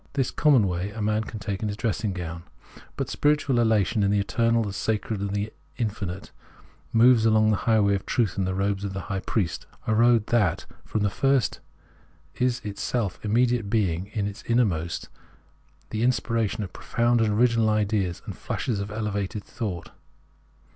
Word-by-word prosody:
This 135 -3 0
common 135 -9 +4
way 90 +2 -2
a 110 +2 -8
man 105 +1 0
can 110 - -7
take 100 -1 -4
in 110 - -1
his 100 0 -4
dressing 110 -1 -1
gown. 85 -2 -5 0.6
But - - -2
spiritual 145 -4 +2
elation 110 -1 +2
in 100 - +3
the 100 0 +2
eternal, 115 +3 +2
the 100 -2 -4
sacred, 110 +1 -1
the 105 +2 -2 0.2
in 115 -3 +1
finite, 95 -3 -6 0.6
moves 115 0 +6
along 110 -1 +4
the 105 - +2
highway 105 -3 +4
of 95 - -3
truth 115 -8 +1
in 95 - 0
the 95 0 -1
robes 100 0 0
of 100 -1 -3
the 95 - -4
high 95 - -1
priest 95 -4 -2
— - - -31
a 110 - +1
road, 115 -1 +4
that, 100 -8 +2 0.2
from 110 - -2
the 100 - +1
first, 135 0 +1 0.8
is 125 0 +1
it 105 -1 -6
self 110 -7 -2
immediate 115 0 +2
being 95 -5 0
in 105 -1 -2
its 100 +2 -5
innermost, 95 -9 0 0.8
the 110 - -2
inspiration 115 -3 0
of 95 - -8
profound 120 0 +1
and 110 -1 +2
original 115 0 +3
ideas 105 -4 0
and - - -6
flashes 115 -6 -3
of 100 +1 -4
elevated 105 -1 -3
thought. 100 -8 -5
105 Hz, 180 wpm, -25 LUFS, 100-115 Hz, 0.8 s, moves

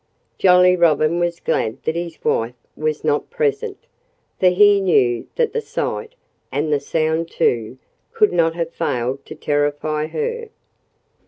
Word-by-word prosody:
Jolly 180 -1 +6
Robin 165 -1 +2
was 175 -1 -1
glad 110 - -2
that 160 - -1
his 170 -1 -4
wife 115 +2 0 0.2
was 155 0 -2
not 150 -1 0
present, 465 -3 -1 0.6
for 185 - +4
he 200 +2 +5
knew 125 -11 +2
that 475 -2 0
the 460 - -1
sight, 455 +2 -4 0.4
and 150 +2 0
the 145 - +2
sound 160 +3 -1
too, 115 +1 0 0.3
could 445 -2 +2
not 165 -1 +2
have 170 -1 -3
failed 130 -3 -2
to - - -8
terrify 145 +1 -1
her. 465 - -4
165 Hz, 145 wpm, -20 LUFS, 145-195 Hz, 0.6 s, Jolly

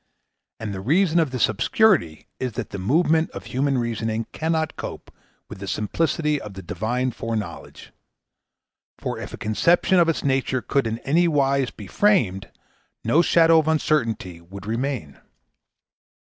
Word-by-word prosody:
And 105 -2 -4
the 95 - -5
reason 170 - +3
of 160 -4 +2
this 130 -2 +2
obscurity 170 - +2
is 130 -3 -3
that 120 -1 -5
the 100 - -5
movement 160 - +2
of - - -7
human 135 +1 0
reasoning 115 -1 -2
cannot 160 0 -1
cope - - -7 0.4
with - - -10
the 100 - -7
simplicity 150 - 0
of 105 -2 -9
the 95 - -8
Divine 110 +8 -2
foreknowledge; 115 -2 -6 1.0
for - - -4
if - - -7
a - - -7
conception 175 - +2
of 170 -1 +4
its 165 - -1
nature 130 -2 0
could 135 -4 0
in 110 0 -2
any 170 +5 +3
wise 140 -4 +2
be 105 - -11
framed, 95 - +1 0.5
no 145 +9 +4
shadow 165 -1 +5
of 155 - -1
uncertainty 115 - 0
would 95 +3 -11
remain. 115 - -3
130 Hz, 150 wpm, -23 LUFS, 110-160 Hz, 1.0 s, shadow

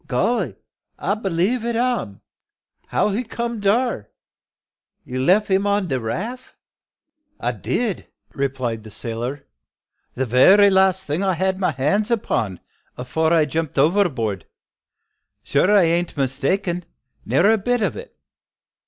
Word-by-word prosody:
"Golly! 180 - 0 0.4
I 200 - -1
b'lieve 205 +3 0
it 235 0 -1
am. 235 - -1 0.7
How - - +1
he 210 +5 -1
come 235 0 -4
dar? 205 - 0 1.0
You 130 +1 -4
leff 195 +6 +3
'im 195 +2 +2
on 200 -3 0
de 130 -2 0
raff?" 215 - -5 0.8
"I - - -1
did," 225 -6 -2 0.3
replied 130 -5 -2
the 110 - -11
sailor. 120 +6 -5 0.7
"The 130 - -1
very 190 - +6
last 190 0 +3
thing 150 +5 -2
I 195 -1 +1
had 190 +2 -1
my 185 - +1
hands 150 - 0
upon, 115 - -1 0.4
afore 160 +6 -1
I 165 -2 +4
jumped 160 -2 -3
overboard. 135 - +1 1.0
Sure 140 - +2
I 205 -2 +6
bean't 170 0 0
mistaken, 170 +7 -1 0.4
ne'er 200 +5 +3
a 225 - +2
bit 245 +2 0
o' 205 - -1
it. - - -13
180 Hz, 135 wpm, -21 LUFS, 135-210 Hz, 1.0 s, very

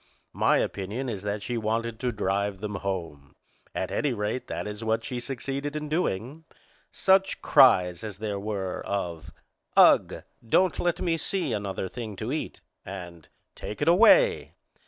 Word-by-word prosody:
My - - +3
opinion 105 +7 -3
is 105 -5 -4
that 100 0 -3
she 120 +1 -2
wanted 115 +1 -2
to 125 -1 -1
drive 100 -2 -1
them 105 0 -4
home. 85 -8 -5 0.4
At - - -2
any 145 -4 0
rate, 105 +3 -3
that - - -4
is 105 +2 -6
what 110 0 0
she 125 -1 -4
succeeded 135 +3 -4
in 150 0 -4
doing. 150 - -2 0.5
Such 195 0 +2
cries 90 - +5
as 105 -3 -6
there 105 -1 -3
were 100 -3 -4
of 85 -5 -4 0.5
"Ugh! - - +5 0.2
Don't 175 +10 +2
let 175 -1 0
me 165 -2 +1
see 165 -4 -1
another 100 -2 -3
thing 110 0 -7
to 110 +5 -4
eat!" 155 - -4 0.2
and 90 -4 -9 0.3
"Take 105 - -7
it - - -1
away!" 445 - +5
110 Hz, 155 wpm, -27 LUFS, 100-140 Hz, 0.5 s, cries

